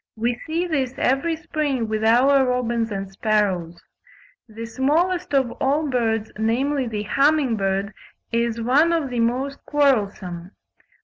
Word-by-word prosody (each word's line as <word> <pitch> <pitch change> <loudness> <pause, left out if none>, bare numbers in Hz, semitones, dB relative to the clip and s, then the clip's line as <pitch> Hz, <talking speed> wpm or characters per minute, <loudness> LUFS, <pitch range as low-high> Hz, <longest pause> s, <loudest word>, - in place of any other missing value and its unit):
We 235 +2 0
see 330 +3 -1
this 270 -7 -2
every 275 +6 +1
spring 300 -7 -2
with 215 0 -2
our 260 +5 +5
robins 240 -3 0
and 195 -2 -5
sparrows. 195 -5 -1 0.7
The 225 +1 -7
smallest 315 +10 0
of 265 -3 +2
all 290 +3 +1
birds, 225 -3 0
namely 260 +5 0
the 210 -2 -3
humming 275 +2 +2
bird, 195 0 -1 0.4
is 235 0 0
one 280 +9 +3
of 305 -6 -1
the 245 - -2
most 255 +4 -1
quarrelsome. 205 -11 0
245 Hz, 135 wpm, -22 LUFS, 220-280 Hz, 0.7 s, our